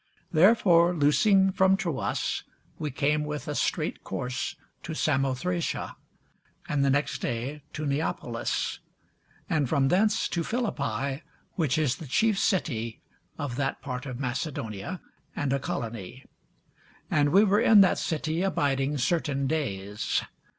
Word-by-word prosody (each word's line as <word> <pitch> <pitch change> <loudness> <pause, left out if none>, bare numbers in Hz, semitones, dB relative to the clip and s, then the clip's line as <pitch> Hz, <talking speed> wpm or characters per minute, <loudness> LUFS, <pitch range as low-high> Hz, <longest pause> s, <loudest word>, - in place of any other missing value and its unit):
Therefore 175 -1 +5
loosing 190 +6 +4
from 190 +1 +4
Troas, 170 -10 -2 0.4
we 150 - -2
came 150 +3 +1
with 150 -3 -5
a - - -2
straight - - -1
course 125 0 -3 0.3
to 160 - -6
Samothracia, 150 +5 -1 0.7
and 145 -2 +1
the 140 - +3
next 140 +1 0
day 125 +6 -3
to 155 - -4
Neapolis; 140 -5 -2 0.7
and 150 -5 +1
from 135 -3 +2
thence 210 +5 +2
to 170 - -1
Philippi, 140 - -2 0.3
which 155 -6 0
is 140 -4 +1
the 160 - -9
chief 215 - +2
city 115 - 0 0.4
of 135 -4 -4
that 140 -1 -1
part 130 +1 -5
of 125 -2 -6
Macedonia, 130 - -4 0.3
and 135 -2 0
a 140 - +1
colony: 115 -2 -5 0.9
and 145 -1 +3
we 195 +7 +6
were 205 +1 +3
in 215 -3 +7
that 190 - +4
city 160 +1 -1
abiding 145 -6 0
certain 140 -1 0
days. 105 -9 -1
145 Hz, 130 wpm, -27 LUFS, 130-170 Hz, 0.9 s, in